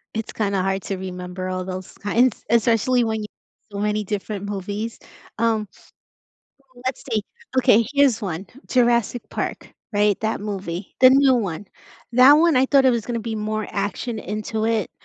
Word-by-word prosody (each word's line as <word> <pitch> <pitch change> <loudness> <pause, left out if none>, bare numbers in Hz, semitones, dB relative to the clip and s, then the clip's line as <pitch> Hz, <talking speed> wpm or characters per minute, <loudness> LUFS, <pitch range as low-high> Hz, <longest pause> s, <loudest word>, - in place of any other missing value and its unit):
It's 220 0 -3
kinda 200 -3 -1
hard 195 +1 -1
to 195 - -3
remember 185 0 -6
all 185 0 -3
those 185 0 -6
kinds, 230 +4 +1
especially 235 +2 +3
when 220 -1 -1
you 210 - -5 0.4
so 200 - -5
many 210 +1 0
different 205 0 -4
movies, 205 +3 -4 0.4
um 225 -2 +1
So, - - -22 1.0
let's 255 0 -3
see. 215 -2 +1 0.4
Okay, 245 -3 +5
here's 280 -5 +3
one, 190 -1 -4 0.2
Jurassic 240 -1 +2
Park, - - -4 0.2
right, 205 -1 +2
that 220 0 -1
movie, 195 -3 -5
the 255 - +9
new 270 0 +5
one. 200 -5 -2 0.5
That 255 +4 +8
one, 315 0 +5
I 260 +1 +4
thought 275 0 +4
it 260 - +6
was 235 -3 -1
gonna 235 -1 -2
be 225 0 -4
more 215 0 -2
action 205 +3 -3
into 215 +1 -3
it 225 -4 0
215 Hz, 165 wpm, -22 LUFS, 200-240 Hz, 1.0 s, the